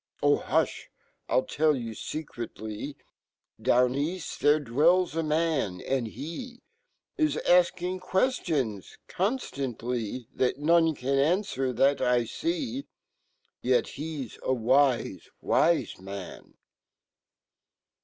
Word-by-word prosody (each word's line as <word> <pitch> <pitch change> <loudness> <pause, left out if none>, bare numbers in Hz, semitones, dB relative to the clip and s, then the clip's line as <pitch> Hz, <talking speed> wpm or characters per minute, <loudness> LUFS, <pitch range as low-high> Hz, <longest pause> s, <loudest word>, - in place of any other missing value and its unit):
Ch,hu(h! - - +1 0.4
riltellyou 130 -4 +1
secretly, 120 -3 -6 0.6
DownEafl 130 +8 +2 0.2
fhere 150 +1 +4
dwells 165 +7 +3
a 165 - +1
man 155 - 0
,and 130 -4 -1
he 170 - -7 0.6
Is 310 -1 +2
afking 180 +1 +3
quertions 165 - -1
conrtantly, 125 - -2
That 130 0 +1
none 165 +1 +3
can 135 +2 -1
anfwer, 140 - +1
fhat 140 +1 +3
I 125 -2 +3
see 280 - -2
j - - -27 0.7
Yet 125 0 +2
he 150 -3 -5
c - - -16
s - - -24
a 130 - +1
wise 125 - +2
'wise 170 - +2
man! 95 0 -9
140 Hz, 100 wpm, -28 LUFS, 125-170 Hz, 0.7 s, fhere